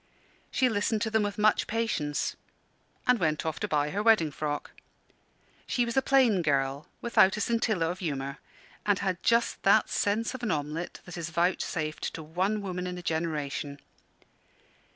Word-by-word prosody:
She 260 - +2
listened 220 -1 0
to 220 - -2
them 220 0 +3
with 205 -1 -2
much 210 0 +3
patience, 205 -10 -1 0.7
and 250 -2 +4
went 155 -3 0
off 160 -1 -2
to - - -1
buy 150 -1 +1
her 205 - -1
wedding 215 -9 +4
frock. 145 0 -3 1.0
She 245 - +1
was 235 - -4
a 265 - +4
plain 260 -8 +4
girl, 140 -2 0
without 215 -4 +4
a - - -2
scintilla 220 -7 +1
of 180 - -7
humour; 140 -5 -3 0.4
and 205 -2 +2
had 185 -3 -2
just 230 0 +2
that 205 +2 +4
sense 215 +4 0
of 260 - -7
an 240 - -2
omelet 150 +2 -3
that 180 -1 -8
is 170 0 -4
vouchsafed 160 -3 -1
to 160 - -6
one 190 +7 -1
woman 180 -1 -3
in 180 0 -4
a 180 - -8
generation. 150 -3 -2
180 Hz, 170 wpm, -28 LUFS, 155-220 Hz, 1.0 s, and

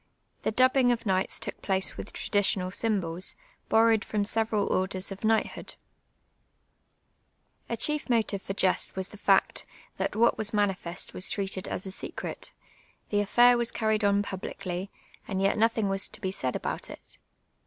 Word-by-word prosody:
The - - 0
dubhinjj^ 255 +1 +4
of 230 -1 -5
knights 190 -2 0
took - - -6
place 190 -1 +1
with - - -7
traditional 195 -3 0
symbols, 185 -5 -1 0.3
bonowed 225 -1 +4
from 210 -1 -1
several 220 0 +1
orders 185 +1 -1
of 195 - -6
kni; 220 0 +2
rhtli()0(l. - - -9 1.9
A 230 - -2
chief 300 +3 +1
motive 220 -4 +1
for 195 - -5
jest 190 -2 +1
was 190 0 -3
the 210 - -12
fact, 195 -2 +2 0.3
that - - -2
what 235 +2 +3
was 215 0 +1
manifest 195 -4 -1
was 185 - +1
treated 195 -2 -2
as 185 - -3
a 190 - -5
secret; - - -6 0.6
the 205 - +2
affair 240 +4 +5
was 235 -1 +2
carried 220 -1 0
on 200 0 +3
publicly, 190 -1 -5 0.4
and 190 - -2
yet 195 +1 +2
nothinfjj 225 -1 +2
was 195 0 0
to - - -10
be 190 - -2
said 130 -9 -2
about - - -4
it. - - -11
205 Hz, 165 wpm, -28 LUFS, 190-225 Hz, 1.9 s, affair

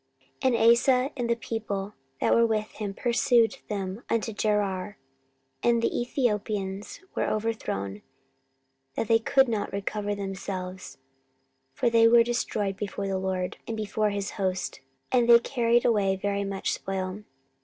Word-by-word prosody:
14:014:013 260 -3 +3
And 230 0 +6
Asa 255 +3 +3
and 240 -3 -2
the 235 - +3
people 210 -3 -4 0.3
that - - +3
were 230 - +5
with 215 -1 -1
him 205 -2 -5
pursued 235 -1 +2
them 195 0 -3
unto 225 -1 0
Gerar: 205 -2 -1 0.6
and 235 -1 +3
the 230 - 0
Ethiopians 210 - -2
were - - 0
overthrown, 155 - -2 0.9
that 225 - -1
they 225 0 +5
could 270 +4 +3
not 220 -3 -2
recover 205 +1 -2
themselves; 190 -2 -5 0.8
for 240 -2 +1
they 230 0 +6
were 235 0 +7
destroyed 215 -4 -1
before 200 -1 -4
the 190 -1 -1
LORD, 185 -1 -2
and 225 - -3
before 215 0 0
his 200 -1 -3
host; 185 -8 -2 0.3
and 245 -2 +3
they 235 - +10
carried 235 -1 +1
away 200 -4 +3
very 200 +1 -1
much 195 -1 -2
spoil. 190 +1 -4
210 Hz, 145 wpm, -27 LUFS, 195-230 Hz, 0.9 s, they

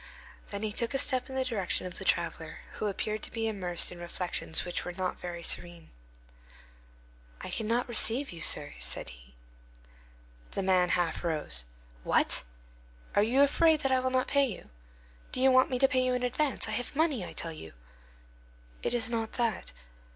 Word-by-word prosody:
Then 200 +1 -4
he 215 -1 -2
took 235 +4 0
a - - +4
step 260 -2 +3
in 265 - -6
the 260 -1 0
direction 210 -7 -1
of 180 - -5
the - - -5
traveller, 165 -3 0
who 215 - -3
appeared 215 +2 -2
to - - -4
be 225 -1 -2
immersed 185 -5 -1
in 175 - -9
reflections 175 -1 -1
which 175 - -1
were 180 - -5
not 185 0 -2
very 170 -1 -6
serene. 175 -1 -3 1.5
"I - - -5
cannot 230 +3 0
receive 240 +3 +2
you, 170 -2 -7
sir," - - +2
said 60 +1 -3
he. - - -14 1.2
The 195 - -1
man 185 -1 +3
half 175 -2 0
rose. 150 - -2 0.4
"What! - - +3 0.7
Are - - +6
you 250 +6 +4
afraid 315 +2 +4
that 270 - +1
I 260 - +4
will 260 0 0
not 255 0 +2
pay 280 -1 +3
you? 200 - -8 0.6
Do - - -1
you 265 +1 +6
want 255 0 +5
me 255 - 0
to 270 +2 +5
pay 260 -2 +2
you 255 0 +1
in 250 - -2
advance? 260 +2 0
I - - -3
have 245 +6 -3
money, 300 - +2
I - - -7
tell 165 -1 -2
you." 80 - -10 1.1
"It - - 0
is 230 -2 +1
not 225 -1 -2
that." 230 -4 -1
220 Hz, 190 wpm, -30 LUFS, 175-255 Hz, 1.5 s, Are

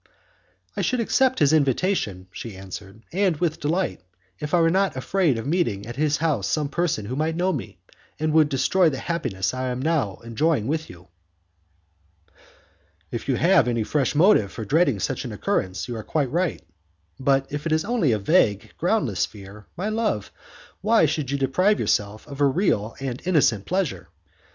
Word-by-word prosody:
"I - - -1
should 255 - 0
accept 260 +3 +2
his 145 -1 +4
invitation," 140 - +1
she 110 +2 -8
answered, 95 +3 -9
"and 190 -3 +2
with 160 -1 -1
delight, 150 - -1 0.4
if 150 -1 -5
I 175 - +4
were 165 0 +4
not 195 -1 +1
afraid 160 -1 +1
of 115 - -5
meeting 140 - 0
at 120 +1 -7
his 150 +1 +1
house 145 -11 0
some 150 -2 0
person 155 -9 -1
who 125 +5 -4
might 155 +3 -1
know 185 +2 +1
me, 140 - -6 0.4
and 155 0 0
would 155 -2 +5
destroy 160 +7 +3
the 135 - -4
happiness 130 - -2
I 130 0 -2
am 125 0 -3
now 140 - 0
enjoying 115 +2 0
with 155 +4 -2
you." 90 0 -14 2.0
"If - - -5
you - - +3
have 175 -3 +4
any 120 -2 0
fresh 140 +5 0
motive 155 - +4
for 110 - -6
dreading 140 - +2
such - - -2
an - - -6
occurrence, 95 0 -2
you 120 - -4
are 110 - -5
quite 140 -1 -1
right, 175 - -1 0.6
but 135 0 +2
if 145 +2 -3
it - - -2
is 155 +2 +1
only 225 - +1
a 110 - +2
vague, 105 - +2
groundless - - +1
fear, 100 +1 -13
my 195 +5 -2
love, 215 - -1 0.5
why 220 -2 +4
should 150 -3 -1
you 140 - 0
deprive 185 +10 +2
yourself 105 +1 -1
of 140 -1 -7
a 140 - +6
real 130 - 0
and 130 -2 -4
innocent 135 - +2
pleasure? 185 -4 -2
145 Hz, 180 wpm, -24 LUFS, 115-170 Hz, 2.0 s, a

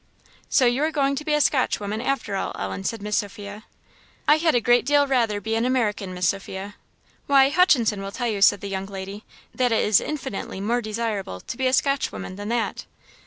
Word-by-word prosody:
"So 260 - +4
you 245 +3 +2
are 310 - +2
going 280 -2 +1
to 300 - -4
be 300 0 +1
a - - +2
Scotchwoman, 220 -7 0
after 270 -6 -2
all, 195 - -2
Ellen," 95 0 -4
said 220 - -3
Miss 210 0 0
Sophia. 205 +1 -5 0.6
"I 300 - +6
had 320 -2 +2
a - - +5
great 240 +1 +3
deal 285 +1 +3
rather 235 -6 +1
be 220 +2 -3
an 225 +1 +1
American, 220 -6 0
Miss 180 -2 -1
Sophia." 195 0 -5 0.5
"Why, 275 -1 +5
Hutchinson 255 - +3
will 195 0 -5
tell 240 +3 -3
you," 210 -3 -2
said 205 0 +5
the 200 - -5
young 195 0 -4
lady, 195 +1 -7 0.3
"that 250 -2 +1
it 225 - +2
is 210 -2 +4
infinitely 265 -10 -5
more 235 +5 0
desirable 215 - -3
to - - -6
be 260 +1 0
a - - +2
Scotchwoman 275 -8 -1
than 205 +2 -6
that." 235 -1 -2
225 Hz, 210 wpm, -24 LUFS, 200-265 Hz, 0.6 s, I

